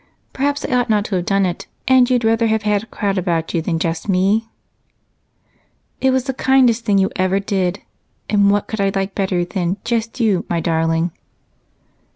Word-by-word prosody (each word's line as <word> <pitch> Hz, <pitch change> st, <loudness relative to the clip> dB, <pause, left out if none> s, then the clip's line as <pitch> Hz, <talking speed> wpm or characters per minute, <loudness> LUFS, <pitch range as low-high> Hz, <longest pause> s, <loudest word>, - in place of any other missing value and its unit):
Perhaps 285 Hz, +1 st, -1 dB
I -, -, -3 dB
ought 245 Hz, -1 st, +1 dB
not 210 Hz, -2 st, +2 dB
to 200 Hz, -, -2 dB
have 175 Hz, -1 st, -2 dB
done 195 Hz, -1 st, +2 dB
it 180 Hz, -1 st, -4 dB, 0.2 s
and 260 Hz, -1 st, +5 dB
you'd 250 Hz, -2 st, +2 dB
rather 225 Hz, +1 st, +2 dB
have 220 Hz, -1 st, 0 dB
had 210 Hz, -1 st, +1 dB
a -, -, -11 dB
crowd 200 Hz, -5 st, -2 dB
about 170 Hz, -3 st, -2 dB
you 170 Hz, -, +1 dB
than 165 Hz, +1 st, -1 dB
just 165 Hz, +2 st, -3 dB
me?" 200 Hz, +4 st, +1 dB, 1.5 s
"It 265 Hz, -, +2 dB
was 260 Hz, -1 st, +1 dB
the 265 Hz, 0 st, -3 dB
kindest 255 Hz, -3 st, +3 dB
thing 200 Hz, -1 st, +3 dB
you 190 Hz, 0 st, +2 dB
ever 185 Hz, +1 st, +1 dB
did, 195 Hz, -2 st, -1 dB, 0.5 s
and 205 Hz, -1 st, +3 dB
what 205 Hz, 0 st, +1 dB
could 220 Hz, -2 st, -3 dB
I 195 Hz, 0 st, +2 dB
like 195 Hz, 0 st, -2 dB
better 190 Hz, -3 st, 0 dB
than 180 Hz, 0 st, -2 dB
'just 230 Hz, +1 st, -2 dB
you,' 210 Hz, -6 st, +2 dB
my 170 Hz, -, 0 dB
darling?" 165 Hz, +1 st, 0 dB
200 Hz, 190 wpm, -19 LUFS, 180-230 Hz, 1.5 s, and